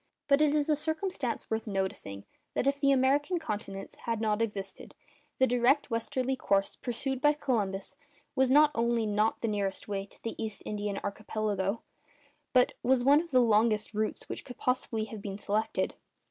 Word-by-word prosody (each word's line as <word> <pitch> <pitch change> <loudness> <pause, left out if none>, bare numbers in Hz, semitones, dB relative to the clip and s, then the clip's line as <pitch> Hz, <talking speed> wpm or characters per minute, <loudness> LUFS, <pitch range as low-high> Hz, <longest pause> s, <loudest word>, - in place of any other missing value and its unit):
But 280 +1 +4
it 300 -1 +4
is 295 -1 +1
a 305 - +3
circumstance 315 -6 -2
worth 220 0 -1
noticing, 190 - -3 0.3
that - - +1
if 280 +1 +1
the 275 -1 +4
American 275 +6 +3
continents 205 -11 -5
had 230 -2 0
no 220 -1 +1
existence, 205 -3 -4 0.4
the 260 - +5
direct 250 +2 +2
westerly 255 +3 -1
course 195 -6 +1
pursued 260 +2 -3
by 295 +1 +5
Columbus 210 -8 -2 0.4
was 265 -1 +3
not 295 +3 +6
only 235 -1 +1
not 215 +1 +1
the 230 - 0
nearest 200 -2 -2
way 200 -1 -3
to - - -15
the 230 - -3
East 215 -2 -5
Indian 205 -1 -3
Archipelago, 205 0 -2 0.7
but 250 -1 +4
was 250 0 +3
one 285 +4 +6
of 340 - -10
the 255 -4 +5
longest 215 -1 +3
routes 215 +1 -2
which - - -5
could 250 - -10
possibly 250 -3 -1
have 220 -1 -8
been 195 -1 -5
selected. 210 +1 -1
230 Hz, 175 wpm, -30 LUFS, 210-265 Hz, 0.7 s, not